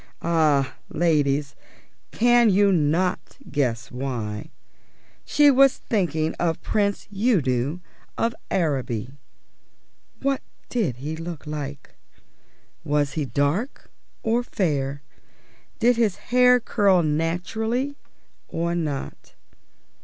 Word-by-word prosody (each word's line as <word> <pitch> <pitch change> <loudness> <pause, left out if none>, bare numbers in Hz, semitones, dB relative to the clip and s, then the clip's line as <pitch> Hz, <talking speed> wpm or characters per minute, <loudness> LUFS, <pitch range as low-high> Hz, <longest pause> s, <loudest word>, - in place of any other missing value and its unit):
Ah, 155 -5 +2
ladies, 145 -4 +1 0.6
can 240 0 +4
you 200 +1 +4
not 175 +2 0
guess 125 -4 -1
why? 120 -5 -4 0.8
She 295 -1 +5
was 275 0 +5
thinking 165 -7 -1
of 165 -2 0
Prince 200 -1 0
Udo 160 - +1 0.4
of 230 0 +1 0.2
Araby. 130 - -1 1.1
What 275 -1 +1 0.3
did 210 - 0
he 150 +5 -5
look 165 -1 -7
like? 145 -2 -6 0.9
Was 145 -1 0
he 150 -2 -1
dark 145 - -1 0.3
or 230 +2 +2
fair? 145 - -2 0.7
Did 240 +1 +3
his 220 -5 +2 0.2
hair 250 0 +6
curl 200 -6 +3
naturally 185 - -1 0.5
or 170 +1 -2
not? 150 -5 -4
165 Hz, 95 wpm, -24 LUFS, 140-220 Hz, 1.1 s, hair